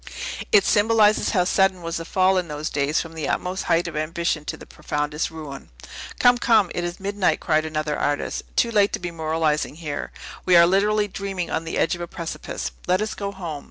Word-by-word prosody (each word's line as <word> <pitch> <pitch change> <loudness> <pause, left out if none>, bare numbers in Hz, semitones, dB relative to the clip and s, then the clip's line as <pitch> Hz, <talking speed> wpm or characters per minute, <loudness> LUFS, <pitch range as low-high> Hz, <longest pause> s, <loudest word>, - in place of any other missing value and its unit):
It 200 -2 +6
symbolizes 215 0 +4
how 185 -5 +2
sudden 185 0 +2
was 165 0 -3
the 165 - -6
fall 185 +1 +3
in 180 - -4
those 150 0 -4
days 145 +2 +1
from 165 -1 -6
the 160 -3 -3
utmost 185 +1 -2
height 170 +1 +2
of 170 - -6
ambition 155 0 -1
to - - -3
its - - -12
profoundest 150 +1 -3
ruin." 155 -4 -9 0.5
"Come, 245 0 +5
come; 220 -7 +3
it 175 - -2
is 175 +1 -4
midnight," 200 0 0
cried 155 -1 +1
another 155 -1 -2
artist, 145 0 -1
"too 235 - +2
late 205 -2 +3
to - - -1
be 175 -1 -4
moralizing 160 -2 -1
here. 155 -3 -5 0.3
We 180 - +4
are 170 0 +8
literally 205 +3 +2
dreaming 195 -3 -4
on 165 - -2
the 165 - -3
edge - - +2
of 175 - -5
a 175 - -4
precipice. 165 - -5 0.2
Let 185 +1 +3
us 215 +1 -2
go 200 -1 -4
home." 170 -7 -6
175 Hz, 210 wpm, -23 LUFS, 155-195 Hz, 0.5 s, are